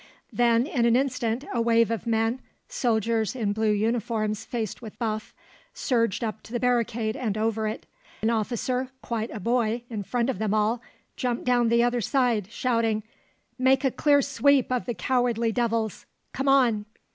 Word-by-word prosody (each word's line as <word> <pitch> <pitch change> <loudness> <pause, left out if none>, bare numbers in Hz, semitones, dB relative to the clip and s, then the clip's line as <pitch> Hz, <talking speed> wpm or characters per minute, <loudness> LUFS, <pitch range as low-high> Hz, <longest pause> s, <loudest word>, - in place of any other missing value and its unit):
Then 235 0 +3
in 275 -7 0
an 235 - +4
instant 255 -1 0
a 235 - +1
wave 230 -1 +3
of 230 +1 -3
men, 225 +2 +1 0.3
soldiers 230 - 0
in 215 -5 -1
blue 220 +1 +1
uniforms 215 0 -1
faced 225 -3 -4
with 220 -3 -10
buff 215 -2 -3 0.4
surged 230 -4 0
up 220 -1 -3
to - - -15
the 240 - -1
barricade 235 -2 0
and 225 -6 -2
over 220 0 0
it. 215 - -5 0.4
An 225 - +3
officer, 250 +3 -1
quite 230 -1 -3
a 220 - -6
boy, 230 +2 0
in 215 -2 -3
front 240 +5 0
of 225 - -7
them 215 -1 0
all, 215 +3 +1 0.4
jumped 245 -2 -1
down 245 -2 +3
the 235 +1 +4
other 240 0 +1
side, 235 -4 +1
shouting, 230 -2 0 0.6
"Make 260 +1 +3
a 265 - +2
clear 285 +2 +3
sweep 280 -1 +2
of 250 0 -1
the 240 - -2
cowardly 235 +2 +1
devils, 230 -2 -1 0.3
come 270 +1 -2
on!" 240 -6 +3
230 Hz, 170 wpm, -26 LUFS, 220-250 Hz, 0.6 s, an